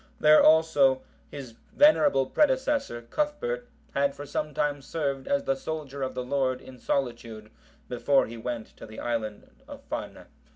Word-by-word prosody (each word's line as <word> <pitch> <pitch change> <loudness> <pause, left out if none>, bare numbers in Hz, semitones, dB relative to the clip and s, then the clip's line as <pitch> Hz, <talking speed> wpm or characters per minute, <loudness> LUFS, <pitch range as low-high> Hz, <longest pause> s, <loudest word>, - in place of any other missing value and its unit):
There 155 0 +7
also 145 -5 +4 0.3
his 135 -4 -8 0.2
venerable 195 - +5
predecessor, 265 - +1
Cuthbert, 300 - -2 0.3
had 140 0 +1
for 145 - -8
some 150 +1 -3
time 145 0 -1
served 140 -2 -3
as 280 0 +1
the 270 - +1
soldier 155 - -6
of 130 -1 -3
the 125 - -3
Lord 130 -1 0
in 130 -1 -13
solitude 115 -5 -3 0.4
before 135 +3 +2
he 115 - -9
went 115 -1 -6
to - - -10
the 110 - -10
isle 115 -3 -2 0.4
of - - -11
Farne. - - -5
140 Hz, 155 wpm, -27 LUFS, 125-160 Hz, 0.4 s, There